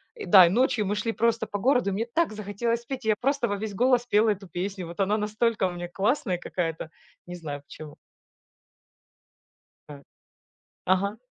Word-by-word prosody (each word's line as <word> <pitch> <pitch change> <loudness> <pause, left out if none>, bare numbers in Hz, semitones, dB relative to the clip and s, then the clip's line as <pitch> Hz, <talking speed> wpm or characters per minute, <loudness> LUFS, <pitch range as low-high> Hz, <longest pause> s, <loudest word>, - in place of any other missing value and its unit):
и 440 -3 -7
да, 190 -4 +8
и - - +1
ночью 220 0 +1
мы 205 - 0
шли 220 +2 -1
просто 230 0 +1
по 205 - -5
городу, 250 -3 +2
и - - -3
мне 225 +4 -2
так 330 -3 +1
захотелось 215 +3 -2
петь, 255 0 -6
я 220 - +4
просто 275 -1 +1
во 205 - -1
весь 205 0 -5
голос 245 +2 +2
пела 215 0 +3
эту 200 -1 -5
песню. 185 +1 -5
Вот 170 +3 -10
она 200 +2 +2
настолько 215 0 0
у - - -4
меня 175 0 -6
классная 195 +1 0
какая-то, 165 -3 -4 0.4
не 175 - -7
знаю 150 -5 -6
почему. 150 +1 -11 1.9
А 145 -1 -11 0.9
ага. 195 +3 +1
210 Hz, 180 wpm, -26 LUFS, 180-235 Hz, 1.9 s, да